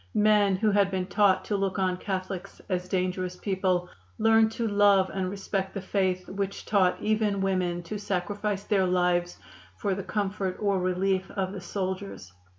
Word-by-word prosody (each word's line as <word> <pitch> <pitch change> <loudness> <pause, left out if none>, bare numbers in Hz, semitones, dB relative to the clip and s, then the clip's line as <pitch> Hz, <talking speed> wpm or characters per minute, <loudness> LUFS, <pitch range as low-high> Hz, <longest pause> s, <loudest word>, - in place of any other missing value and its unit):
Men 210 -2 +4
who 210 +3 +2
had 200 -1 +3
been 190 -1 -2
taught 200 -1 +3
to 210 - -1
look 195 -1 -1
on 185 -1 +1
Catholics 185 0 -5
as 180 -1 -1
dangerous 185 -1 -1
people 185 -2 0 0.3
learned 225 0 +4
to 230 0 -1
love 200 -2 +4
and 190 -1 -1
respect 195 0 -3
the 195 - -3
faith 185 -2 0
which 200 0 -4
taught 190 -4 +2
even 215 -2 +1
women 180 -2 0
to 205 +5 -5
sacrifice 205 +1 -2
their 195 -3 +2
lives 180 -1 +1 0.4
for 200 -2 -1
the 195 - -3
comfort 195 -2 -2
or 200 -2 +1
relief 185 +1 0
of 190 -2 -2
the 195 - -6
soldiers. 190 - -5
195 Hz, 165 wpm, -27 LUFS, 185-205 Hz, 0.4 s, Men